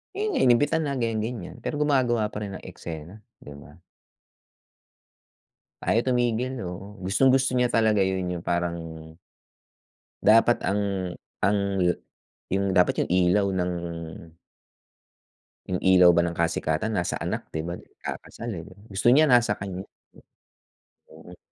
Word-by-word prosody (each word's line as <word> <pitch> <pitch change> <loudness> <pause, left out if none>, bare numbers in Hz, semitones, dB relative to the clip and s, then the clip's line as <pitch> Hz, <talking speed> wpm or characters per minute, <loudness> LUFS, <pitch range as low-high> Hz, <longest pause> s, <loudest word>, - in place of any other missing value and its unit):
'Yun 425 +2 -1
nga, - - 0
inimbita 130 +5 +4
na 145 -3 -2
ganyan, 115 -3 -1
ganyan, 110 -4 -5
pero - - -4
gumagawa 120 -7 +1
pa 105 - -5
rin 100 -2 -5
ng - - -10
eksena, 85 +1 -8 0.2
'di 70 - -10
ba? 75 +1 -15 2.1
Ayaw 115 - +3
tumigil. 125 +1 0
Oo, 95 +4 -8
gustong-gusto 130 +6 +3
niya 125 -1 +2
talaga 110 -3 +3
'yun, 95 -1 0
'yung - - -7
parang 85 -1 -1 1.4
dapat 115 +2 +5
ang 100 -3 -1 0.3
ang 100 0 +3 0.2
yu 90 -1 +3 0.6
'yung 95 0 0
dapat 90 - +3
'yung - - -6
ilaw 90 +3 +3
ng 90 -1 0 2.0
'Yung 90 -1 -2
ilaw 90 -1 +7
ba 85 - +4
ng 85 - -1
kasikatan 85 +5 0
nasa 90 - -1
anak, - - -4
'di 80 - -3
ba, 85 - -3
ikakasal, 115 - -8
eh, 85 - -6 0.2
gusto 100 +3 -1
niya 155 +4 +6
nasa 120 -5 +4
kaniya. 95 0 -6 1.2
Mm. - - -14
100 Hz, 135 wpm, -25 LUFS, 90-120 Hz, 2.1 s, ilaw